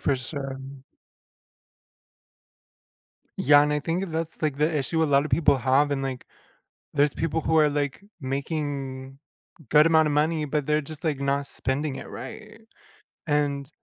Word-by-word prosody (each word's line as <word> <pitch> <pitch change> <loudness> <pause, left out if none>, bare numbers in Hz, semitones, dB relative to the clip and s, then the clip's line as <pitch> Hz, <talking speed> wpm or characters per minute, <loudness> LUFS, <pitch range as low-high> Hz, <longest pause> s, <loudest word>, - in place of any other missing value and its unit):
for 140 - +1
sure. 135 +1 -5 2.8
Yeah, 145 +1 +6
and 150 - +1
I 150 - 0
think 175 +4 -2
that's, 160 0 -4
like, 150 -3 0
the 155 +3 +2
issue 160 +4 0
a - - +4
lot 140 +1 +4
of 150 - -5
people 145 -4 +4
have 135 +3 +3
and, 135 -1 -1
like, 130 -2 -4 0.7
there's 145 0 +3
people 165 0 -1
who 160 +1 +1
are, 150 -1 +5
like, 145 +2 -2 0.2
making, 135 -1 -4 0.5
good 150 0 +6
amount 160 -1 +4
of 145 - -1
money, 155 +1 +1
but 150 -1 -1
they're 150 0 +2
just, 155 +2 -10
like, 150 -4 -1
not 140 0 0
spending 135 +1 -3
it - - -8
right, 220 0 -9 0.6
and 145 -2 0
145 Hz, 155 wpm, -25 LUFS, 140-155 Hz, 2.8 s, Yeah